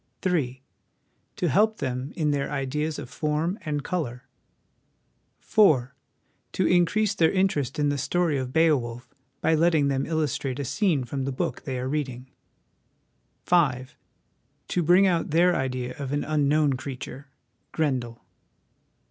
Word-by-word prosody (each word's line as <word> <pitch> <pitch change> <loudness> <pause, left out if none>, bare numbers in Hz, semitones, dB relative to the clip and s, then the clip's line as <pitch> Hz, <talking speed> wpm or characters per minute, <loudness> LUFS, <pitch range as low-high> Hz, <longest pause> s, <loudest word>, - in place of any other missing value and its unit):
" - - -47
3. 135 -8 -1 0.7
To 175 - -1
help 215 +9 +3
them 130 +1 -3
in 150 -3 +1
their 140 -1 -1
ideas 150 +2 -2
of - - -6
form 155 - -2
and 145 -2 -3
colour. 125 -9 -3 0.6
" - - -45
4. 145 - +3 0.6
To - - +1
increase 185 +4 +3
their 165 -5 +3
interest 170 -9 0
in 145 -1 +2
the 145 -1 -1
story 175 +2 +1
of 130 -1 -4
Beowulf 130 -7 +1 0.3
by 160 - +2
letting 160 -3 +3
them 135 -1 -1
illustrate 145 -4 -1
a 140 - -3
scene 160 - +1
from 135 +2 -4
the 135 - -2
book 165 +6 -3
they 130 -3 -3
are 125 +1 -3
reading. 130 -3 -4 0.6
" - - -45
5. 135 -7 +1 0.7
To 180 - 0
bring 175 +4 +5
out 175 -3 +1
their 175 +3 +4
idea 125 -1 -3
of 135 -2 -4
an 145 0 0
unknown 150 -1 +2
creature 135 +1 -7 0.4
(Grendel). 125 -7 -2
145 Hz, 150 wpm, -26 LUFS, 130-165 Hz, 0.7 s, bring